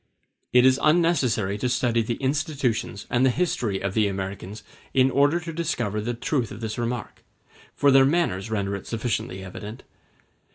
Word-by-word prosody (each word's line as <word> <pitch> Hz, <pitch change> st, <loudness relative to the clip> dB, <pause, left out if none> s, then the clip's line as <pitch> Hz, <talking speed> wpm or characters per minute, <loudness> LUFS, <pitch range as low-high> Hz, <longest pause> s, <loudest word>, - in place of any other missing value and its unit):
It 125 Hz, 0 st, +5 dB
is 130 Hz, +1 st, +5 dB
unnecessary 140 Hz, -, +2 dB
to 125 Hz, -, 0 dB
study 120 Hz, -1 st, +1 dB
the 115 Hz, +1 st, -2 dB
institutions 135 Hz, -, -1 dB
and 120 Hz, +1 st, +2 dB
the 130 Hz, -, +5 dB
history 120 Hz, -, -1 dB
of 95 Hz, -, -2 dB
the 105 Hz, -1 st, +2 dB
Americans 95 Hz, +1 st, -5 dB, 0.3 s
in 130 Hz, 0 st, +4 dB
order 145 Hz, +5 st, +3 dB
to 165 Hz, -1 st, -7 dB
discover 120 Hz, -11 st, -2 dB
the 120 Hz, +3 st, -3 dB
truth 120 Hz, 0 st, -1 dB
of 100 Hz, -, -8 dB
this 110 Hz, 0 st, -4 dB
remark, 120 Hz, -2 st, -4 dB, 0.5 s
for 140 Hz, -, +4 dB
their 135 Hz, 0 st, +7 dB
manners 135 Hz, -, +1 dB
render 100 Hz, -2 st, -1 dB
it 100 Hz, -, -8 dB
sufficiently 110 Hz, -4 st, -3 dB
evident. 105 Hz, +4 st, -8 dB
120 Hz, 165 wpm, -25 LUFS, 105-135 Hz, 0.5 s, their